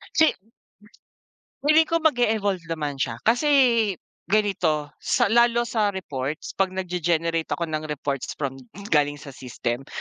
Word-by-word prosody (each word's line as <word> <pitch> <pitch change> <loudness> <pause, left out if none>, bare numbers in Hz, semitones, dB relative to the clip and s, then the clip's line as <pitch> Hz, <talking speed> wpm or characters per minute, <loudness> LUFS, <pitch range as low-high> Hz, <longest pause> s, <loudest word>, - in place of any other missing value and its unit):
Si 320 -1 +5 1.3
Feeling 310 +2 +5
ko 330 0 0
mag-e-evolve 215 - +1
naman 150 -4 -3
siya, 120 -4 -3
kasi, 240 +7 +2 0.8
ganito, 175 -7 +1
sa - - +1
lalo 235 +1 +4
sa 215 -4 0
reports 145 -5 -4
pag 190 -1 +1
nagge-generate 170 -3 -1
ako 170 -2 -4
ng 155 0 -3
reports 140 -2 -3
from 135 -2 -4 0.3
galing 145 -2 +3
sa 145 -1 -10
system, 125 0 -4
170 Hz, 125 wpm, -24 LUFS, 145-215 Hz, 1.3 s, Si